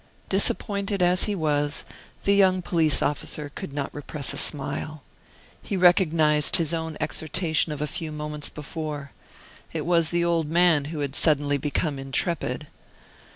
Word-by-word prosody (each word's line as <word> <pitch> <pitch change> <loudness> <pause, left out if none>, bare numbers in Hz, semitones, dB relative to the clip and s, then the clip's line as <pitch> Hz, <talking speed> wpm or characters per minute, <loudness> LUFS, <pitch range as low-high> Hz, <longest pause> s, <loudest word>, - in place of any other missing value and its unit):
Disappointed 200 0 +1
as 180 +1 +3
he 210 - -1
was, 145 -3 0 0.4
the 200 - +3
young 185 -2 +4
police 160 -4 +2
officer 145 0 -2
could - - -6
not 140 0 -4
repress 145 -1 -3
a - - -6
smile. 150 0 0 0.6
He 195 - -3
recognized 160 -5 +4
his 165 -1 +2
own 160 -1 -3
exhortation 160 0 0
of 150 0 -3
a - - 0
few 155 +1 -3
moments 150 -1 -4
before. 150 -2 -6 0.6
It - - -3
was 170 -2 +2
the 170 0 +1
old 165 -3 0
man 165 -3 +3
who 150 0 -5
had 140 -1 -3
suddenly 145 -2 +2
become 145 0 -1
intrepid. 135 +1 -2
155 Hz, 150 wpm, -25 LUFS, 145-175 Hz, 0.6 s, young